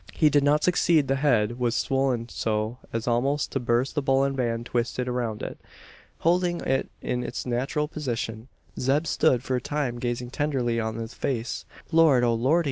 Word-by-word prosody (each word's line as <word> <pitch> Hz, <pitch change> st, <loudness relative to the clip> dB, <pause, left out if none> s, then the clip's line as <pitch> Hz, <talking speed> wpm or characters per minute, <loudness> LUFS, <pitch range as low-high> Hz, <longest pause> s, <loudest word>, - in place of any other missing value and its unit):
He 155 Hz, -2 st, +3 dB
did 145 Hz, 0 st, +4 dB
not 150 Hz, +1 st, +3 dB
succeed. 170 Hz, -5 st, +3 dB
The 135 Hz, +1 st, +1 dB
head 120 Hz, -5 st, +2 dB
was 120 Hz, -1 st, +1 dB
swollen 135 Hz, -3 st, 0 dB
so 110 Hz, +1 st, -2 dB
as 115 Hz, +1 st, -3 dB
almost 135 Hz, +5 st, +1 dB
to 135 Hz, -, -1 dB
burst 120 Hz, +2 st, +1 dB
the 145 Hz, -, 0 dB
bullion 135 Hz, 0 st, +2 dB
band 120 Hz, -2 st, -1 dB
twisted 125 Hz, +1 st, -1 dB
around 120 Hz, -3 st, -2 dB
it! -, -, -6 dB, 0.6 s
Holding 175 Hz, +1 st, +2 dB
it 135 Hz, -, 0 dB
in 125 Hz, 0 st, -1 dB
its -, -, -5 dB
natural 130 Hz, +5 st, -1 dB
position, 120 Hz, -6 st, -4 dB, 0.3 s
Zeb 140 Hz, +5 st, +2 dB
stood 125 Hz, -5 st, +2 dB
for 130 Hz, -1 st, 0 dB
a -, -, -3 dB
time 135 Hz, -3 st, -2 dB
gazing 120 Hz, 0 st, -3 dB
tenderly 130 Hz, -5 st, 0 dB
on 110 Hz, 0 st, -2 dB
the 115 Hz, 0 st, -4 dB
face. 120 Hz, 0 st, -3 dB, 0.3 s
"Lord, 160 Hz, -6 st, +5 dB
O 120 Hz, -1 st, +3 dB
Lordy!" 130 Hz, +9 st, +3 dB
125 Hz, 180 wpm, -26 LUFS, 120-145 Hz, 0.6 s, Lord